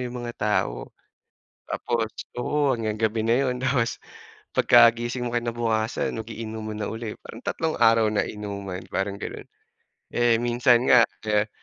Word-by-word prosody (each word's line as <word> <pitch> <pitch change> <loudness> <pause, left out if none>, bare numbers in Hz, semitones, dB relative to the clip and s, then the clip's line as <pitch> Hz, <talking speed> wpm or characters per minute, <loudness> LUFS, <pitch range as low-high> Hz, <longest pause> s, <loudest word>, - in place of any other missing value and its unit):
'yung 125 - -7
mga 120 - -4
tao, - - -1 0.7
tapos 115 -2 -1 0.3
oo, 145 +1 +1
hanggang 110 -3 -2
gabi 110 0 0
na 115 - +4
'yun. 125 -1 -1
Tapos 125 -2 0 0.6
pagkagising 120 +1 +4
mo - - -5
kinabukasan, 115 -1 -1
mag-iinuman 110 -1 -6
na - - -2
ulit, 115 -1 -5
parang 115 - -10
tatlong 160 -1 -1
araw 115 -1 +5
na 105 - +1
inuman, 100 -3 -6
parang 100 +1 -1
gano'n. - - -7 0.7
Eh, 120 -1 +3
minsan 120 +1 +3
nga 125 - +7 0.3
eh, 105 0 +2
115 Hz, 140 wpm, -25 LUFS, 110-120 Hz, 0.7 s, nga